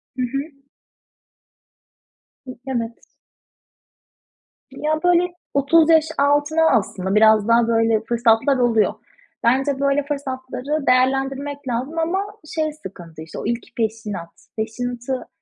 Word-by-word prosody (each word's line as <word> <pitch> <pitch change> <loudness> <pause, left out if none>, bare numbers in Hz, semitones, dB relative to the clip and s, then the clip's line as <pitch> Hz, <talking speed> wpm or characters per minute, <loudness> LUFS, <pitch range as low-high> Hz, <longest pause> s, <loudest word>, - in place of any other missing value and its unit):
Hı 255 - -3
hı. 265 +3 -1 2.3
Evet. 235 -3 -4 1.6
Ya 305 +1 -3
böyle 355 0 +4 0.3
30 310 +4 +4
yaş 320 -1 +5
altına 290 +3 +3
aslında 190 -1 -2
biraz 215 -1 +5
daha, 230 0 +4
böyle, 225 -1 +2
fırsatlar 235 +3 +3
oluyor. 235 -3 +2 0.5
Bence, 270 +3 +2
böyle, 280 0 +1
fırsatları 275 0 -4
değerlendirmek 270 +2 +1
lazım 260 +7 -2
ama 340 +4 0 0.4
şey 310 -1 -1
sıkıntı, 175 - -11
işte, 160 - -8
o - - -6
ilk 235 +1 -4
peşinat. 210 -6 -3 0.3
Peşinatı 245 +3 -4
255 Hz, 105 wpm, -21 LUFS, 225-285 Hz, 2.3 s, yaş